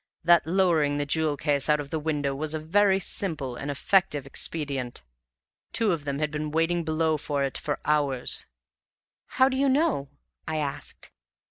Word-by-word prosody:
That 170 -1 +5
lowering 165 -5 +2
the 145 - -1
jewel 155 0 0
case 145 -1 +1
out 150 0 +4
of 140 -1 -6
the 160 - -1
window 145 -3 -1
was 155 +3 -3
a - - -2
very 190 +5 +3
simple 155 -10 0
and 140 +3 -5
effective 145 0 +1
expedient; 140 - -4 0.7
two 225 -3 +2
of 160 -4 -2
them 140 -1 -2
had 150 0 -1
been 150 0 -3
waiting 165 +2 +1
below 160 0 +1
for 145 -1 -2
it 135 - -2
for 145 - -3
hours." 140 -4 0 0.9
"How 260 - +6
do 265 - -1
you 275 0 +3
know?" 270 - +1 0.4
I 160 0 -2
asked. 145 -2 -3
155 Hz, 170 wpm, -26 LUFS, 145-170 Hz, 0.9 s, How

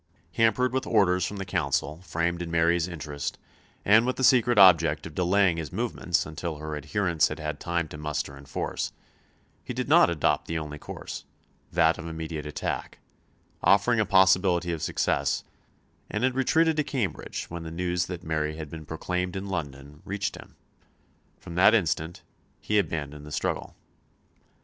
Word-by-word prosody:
Hampered 120 +2 +2
with 130 - -1
orders 95 -4 +3
from 105 - -6
the 95 - -4
Council 75 -3 -1
framed 85 0 -2
in 85 - -4
Mary's 85 +1 +2
interest 75 -4 -5 0.5
and 110 +3 +6
with 130 +1 0
the 130 - -3
secret 120 -2 +5
object 85 -5 +6
of 80 - -8
delaying 90 0 +2
his 80 -2 -5
movements 100 -4 -1
until 80 +1 -5
her 75 +1 -5
adherents 80 +3 +1
had - - -5
had 75 -1 -4
time 85 -1 -1
to 75 - -9
muster 75 -2 -3
in 70 0 -13
force, - - -3 0.7
he - - -6
did - - -2
not - - +6
adopt 85 -4 +1
the 80 - -2
only 75 -2 -6
course - - -8 0.5
that 85 -1 +3
of 80 - -6
immediate 80 -2 -5
attack 75 - -4 0.6
offering 110 +4 +4
a - - +4
possibility 95 -2 +4
of 80 - -5
success, - - 0 0.7
and 105 - -2
had 130 0 +2
retreated 160 +5 +2
to 150 - +2
Cambridge 120 - -3
when 85 0 -5
the 80 - -6
news 90 +1 -1
that 90 -1 -6
Mary 75 -1 -1
had 80 -3 -7
been 80 -2 -8
proclaimed 90 +3 -3
in 95 +1 -4
London 75 -4 -6
reached 100 0 -3
him. - - -13 0.8
From 85 - -10
that 95 +6 +6
instant 80 -4 -1 0.4
he 105 0 +1
abandoned 75 -5 -3
the 75 - -10
struggle. - - -2
85 Hz, 170 wpm, -27 LUFS, 80-100 Hz, 0.8 s, and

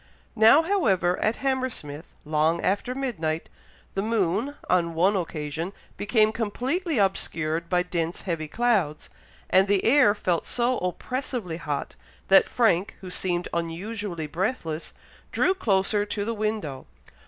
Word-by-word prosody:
Now, 225 +8 +7
however, 195 - +2
at 215 +2 +1
Hammersmith, 255 - -3
long 155 +2 +2
after 205 +6 0
midnight, 165 -13 -2 0.4
the 195 - -1
moon, 220 +5 0
on 170 -2 +1
one 185 +5 +3
occasion, 165 0 -3 0.2
became 215 +1 +2
completely 260 - -2
obscured 170 -4 0
by 180 -1 +2
dense 170 -2 -3
heavy 165 -4 -3
clouds, 200 -6 0 0.4
and 190 +1 +5
the 200 -1 +2
air 245 -4 +5
felt 180 -5 -1
so 245 +1 0
oppressively 215 -1 -3
hot, 150 -4 -4 0.4
that 195 - +6
Frank, 205 -3 +2
who 185 -1 -8
seemed 180 -1 -1
unusually 170 +1 -3
breathless, 165 - -3 0.4
drew 375 - +3
closer 205 - +1
to 205 0 -3
the 230 - -1
window. 210 -11 -3
195 Hz, 130 wpm, -26 LUFS, 170-230 Hz, 0.4 s, Now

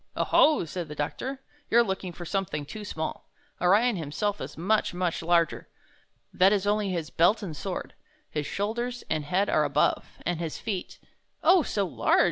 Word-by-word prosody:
"0 - - 0
ho!" 300 - +5
said 170 +1 -5
the 150 - -8
doctor, 260 - -4 0.3
''you're 235 +1 +5
looking 190 -2 -3
for 175 +1 -8
something 170 -6 -2
too 215 +8 -8
small. 160 -6 -5 0.3
Orion 205 +5 +4
himself 180 +7 -2
is - - -7
much, 195 +2 +1
much 180 -2 -1
larger. 170 0 +1 0.6
That 190 +2 +5
is 205 -2 +1
only 205 0 +1
his 170 -4 -3
belt 205 +6 +3
and 170 -6 -5
sword. - - -5 0.3
His 150 -2 -3
shoulders 235 +4 -2
and 155 - 0
head 185 +6 +1
are 155 - +3
above, 145 0 0
and 175 -1 -1
his 165 -2 -3
feet—" 195 -5 -4 0.5
"Oh, 360 +2 +6
so 205 -8 -1
large!" 180 - +2
185 Hz, 175 wpm, -27 LUFS, 165-210 Hz, 0.6 s, Oh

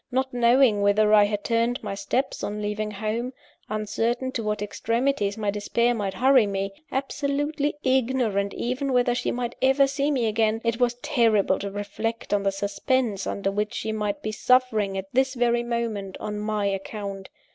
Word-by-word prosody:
Not 260 +1 -1
knowing 240 -2 +4
whither 210 +1 +4
I 210 -1 +7
had 205 0 -2
turned 235 +2 0
my - - -3
steps 200 +7 -2
on 210 +1 -3
leaving 210 +1 -2
home; 220 +5 -3 0.4
uncertain 225 +4 -1
to 235 - -3
what 210 -1 -2
extremities 230 0 -1
my 210 -2 0
despair 235 +4 +1
might 200 -4 -3
hurry 255 -1 +5
me; 195 0 -2 0.2
absolutely 285 +2 -1
ignorant 245 -6 +1
even 255 +3 -2
whether 245 -1 +3
she 245 - -1
might 240 -1 -2
ever 270 +1 +5
see 280 +1 -1
me 260 -5 +1
again 220 0 +1
it 230 0 0
was 245 -1 +2
terrible 230 -10 +2
to 200 - -4
reflect 205 +3 -4
on 205 - +2
the 195 0 +1
suspense 205 +2 -1
under 195 0 -1
which 210 +1 -2
she 220 - -2
might 210 -2 -2
be 215 - -2
suffering, 220 -4 +2
at 190 - -3
this 265 +1 +2
very 240 -1 +2
moment, 230 -5 -3
on 210 -1 -4
my 210 -1 -1
account. 195 0 -4
225 Hz, 175 wpm, -25 LUFS, 205-250 Hz, 0.4 s, I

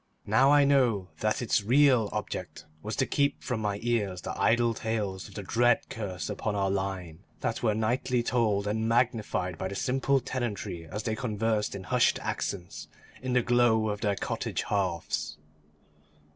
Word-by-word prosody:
Now 130 +7 +4
I 145 -1 +6
know 120 -10 +2
that 110 +3 0
its 110 - +2
real 125 -2 +4
object - - -5 0.2
was 105 +4 -4
to 135 - +1
keep 140 +3 0
from 125 -4 -2
my 105 -2 -1
ears 105 -6 0
the - - -5
idle 120 0 +3
tales 105 -4 -3
of 100 - -15
the 105 - -5
dread 120 +5 +3
curse 95 -7 -4
upon 105 -2 -3
our 95 -1 +1
line, 95 -4 -3 0.2
that 115 - -2
were 110 -3 +2
nightly 120 +2 0
told 110 -4 +1
and 110 +2 -1
magnified 115 -7 0
by 95 - -2
the 100 - -6
simple 135 +3 +1
tenantry 110 -10 -4
as 105 +5 -5
they 110 -1 -1
conversed 110 -3 -1
in 95 - -6
hushed - - +2
accents 90 -3 -4 0.3
in 130 -1 -2
the 125 -1 +3
glow 115 -2 +3
of 105 0 -3
their 105 -2 +1
cottage - - -3
hearths. 85 -6 -2
110 Hz, 170 wpm, -28 LUFS, 100-120 Hz, 0.3 s, I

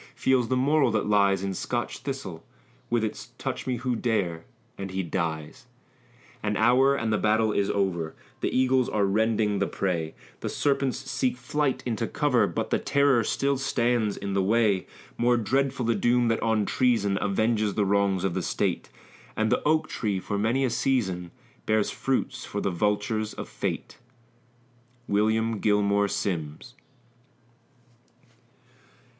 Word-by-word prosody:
Feels 130 -3 +2
the 130 - +1
moral 140 +1 +3
that 110 -2 0
lies 100 -2 +3
in 95 -1 -2
Scotch 120 +6 -3
thistle, 115 - -6 0.5
With 120 -1 +1
its 110 - -4
"touch - - -4
me 130 - 0
who 125 0 -1
dare" 100 -9 -1 0.3
and 100 0 -6
he 95 0 -2
dies! 80 -3 -4 0.7
An 105 -1 -1
hour, 130 +5 +4
and 110 -5 -1
the 105 - +1
battle 110 0 +2
is 100 0 +1
over; 85 -5 -1 0.2
The - - 0
eagles 130 0 +2
are 105 -2 +1
rending 105 0 +1
the - - +1
prey; 85 -5 -2 0.2
The - - -3
serpents 140 -2 0
seek 130 -1 -2
flight 135 +2 -1
into 115 -2 -1
cover, 125 -8 +2
But 85 - -3
the - - +2
terror 140 -4 +3
still 140 +4 0
stands 120 -5 +1
in 100 0 -4
the 95 - +2
way: 105 -1 +2 0.3
More 120 +1 +3
dreadful 130 +2 0
the 115 - +2
doom 120 +3 +2
that 115 - 0
on 110 -2 +1
treason 105 -6 +1
Avenges 105 +1 +1
the 105 - +2
wrongs 100 -1 +1
of 95 -3 0
the - - -1
state; - - -1 0.5
And 110 +1 +1
the 125 - +2
oak 155 +1 +2
tree 100 -4 -2
for 100 +2 -3
many 120 +6 +1
a 125 - -1
season 95 -9 0 0.4
Bears 110 -1 +2
fruit 135 -1 -1
for 130 -5 -5
the 100 - -1
vultures 105 +4 -1
of - - -6
fate! - - -4 1.1
WILLIAM 110 +2 +1
GILMORE 100 -1 +2
SIMMS. 95 +1 -3
110 Hz, 155 wpm, -26 LUFS, 100-125 Hz, 1.1 s, hour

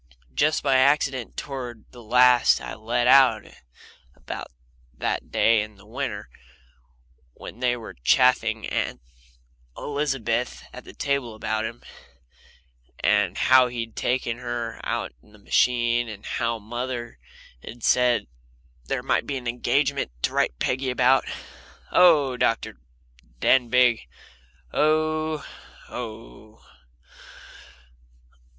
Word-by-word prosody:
Just 155 - +1
by 130 - +3
accident 130 -2 +1
toward 125 -6 -6
the 120 - -13
last 125 +2 +5
I - - -7
let 120 +3 -1
out 125 -4 +6 0.7
about - - -7 0.5
that - - -2
day 115 -2 +3
in 105 0 -7
the 100 - -19
winter 115 -2 -5 1.1
when 115 - -10
they 125 -1 +1
were 115 - -9
chaffing 110 - +2
Aunt - - -2 0.8
Elizabeth 135 -5 -2
at - - -10
the - - -12
table 140 -5 -2
about 110 0 -2
him, 115 +1 -7 1.2
and 105 -3 +2
how 130 -1 +5
he'd 115 -2 -6
taken 120 -1 -1
her 120 -2 -5
out - - -3
in 105 - -23
the - - -16
machine, 120 +2 +1
and 105 -1 -10
how 115 0 -1
mother 120 - -5 0.4
had 120 0 -10
said 125 -1 +3 0.6
there - - -3
might - - 0
be 140 - -2
an 125 -2 -7
engagement 135 - 0
to - - 0
write - - 0
Peggy 130 - -1
about. 125 +1 +3 0.7
"Oh!" 155 -7 +5
said 125 - -8
Dr. 115 - 0 0.6
Denbigh. 125 - +3 0.7
"Oh! 155 -1 +1 0.4
oh!" 110 -2 -9
120 Hz, 115 wpm, -24 LUFS, 115-130 Hz, 1.2 s, out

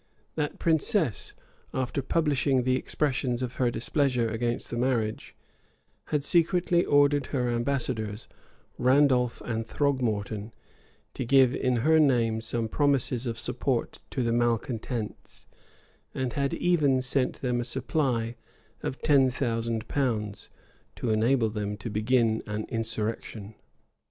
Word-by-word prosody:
[] - - -40
That 150 -2 -2
princess, 160 - +1 0.4
after 130 +1 -1
publishing 140 -3 +1
the 130 +1 +2
expressions 130 -3 -1
of 125 -1 -5
her 125 -2 +2
displeasure 125 0 0
against 120 +2 -2
the - - -2
marriage, 120 -3 -1 0.7
had 150 -2 -1
secretly 175 +2 +2
ordered 145 0 +3
her 125 -3 -1
ambassadors, 120 -3 -2 0.5
Randolf 130 -2 +3
and 115 -1 -3
Throgmorton, 110 -6 -1 0.6
to - - -3
give 130 0 +5
in 125 -1 +1
her 160 0 +5
name 115 -6 +3
some 115 0 -2
promises 135 -1 +1
of 115 -1 -3
support 120 +2 -2
to 130 - -2
the 115 - +1
malecontents; 120 -1 -2 0.7
and 130 -3 -2
had 140 -1 0
even 145 -7 +2
sent 130 0 0
them 125 -2 0
a - - -2
supply 125 -2 -1 0.5
of 130 - -5
ten 140 -4 +5
thousand 115 -3 -2
pounds, 110 -7 -2 0.5
to 120 - -2
enable 115 +1 +2
them 105 -1 -3
to 110 +2 -6
begin 110 +1 +2
an 105 +1 -3
insurrection. 110 -2 -4
125 Hz, 125 wpm, -27 LUFS, 115-140 Hz, 0.7 s, give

